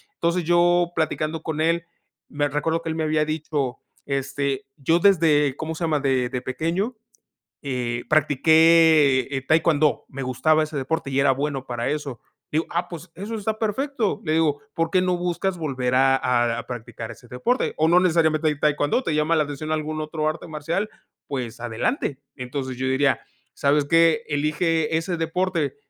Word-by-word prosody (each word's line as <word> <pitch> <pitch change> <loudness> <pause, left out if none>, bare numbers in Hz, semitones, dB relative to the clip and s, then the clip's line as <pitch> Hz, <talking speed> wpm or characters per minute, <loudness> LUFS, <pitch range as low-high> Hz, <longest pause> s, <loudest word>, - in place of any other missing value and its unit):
Entonces, 170 +1 0
yo 175 0 +3
platicando 160 0 -1
con 155 -1 -3
él, 170 +1 +1 0.4
me 145 0 -1
recuerdo 160 +3 -1
que 165 - -5
él 160 - -2
me 160 - -1
había 155 0 +1
dicho, 150 -4 -2 0.3
este, 140 0 -2
yo 165 +5 +2
desde 155 -8 +4
¿cómo 160 0 -4
se 170 - -5
llama? 155 -3 +1
de 130 -3 +1
de 125 - -3
pequeño, 165 - -2 0.7
eh, 125 -3 -3
practiqué, 155 -2 +5
eh, 135 -2 -2
taekwondo, 155 0 +2
me 135 0 -7
gustaba 155 +5 +2
ese 155 -1 -7
deporte 160 +2 -2
y 135 +1 +1
era 135 -1 +4
bueno 140 -1 -2
para 120 -1 -3
eso. 145 -6 -4 0.3
Digo: 160 +2 0
"Ah, 175 +1 -2
pues 170 0 -9
eso 210 +5 -5
está 215 +1 -3
perfecto". 230 +1 -1
Le 155 - 0
digo: 155 -3 +2
"¿Por 165 0 0
qué 185 - +3
no 180 -1 +1
buscas 180 +2 -2
volver 130 -5 -2
a 135 +1 +4
a 120 -2 +1
a - - -7
practicar 115 -2 -7
ese 120 - -16
deporte? 235 - -1
O, 160 - +3
no 175 +2 +5
necesariamente 160 -3 +2
hay 150 -1 -1
taekwondo, 150 - +1
¿te 160 - -2
llama 155 +2 +2
la 155 - +3
atención 145 +2 -5
algún 155 0 -2
otro 155 0 -2
arte 155 +2 -5
marcial?, 160 +7 -2 0.4
pues 125 -4 -5
adelante". 120 - -2 0.2
Entonces 130 0 -5
yo 130 - -1
diría: 135 +1 +2 0.3
"¿Sabes 145 0 +2
qué? 165 0 +3
Elige 155 +2 0
ese 170 +2 -2
deporte". 165 -2 -1
155 Hz, 175 wpm, -23 LUFS, 135-165 Hz, 0.7 s, practiqué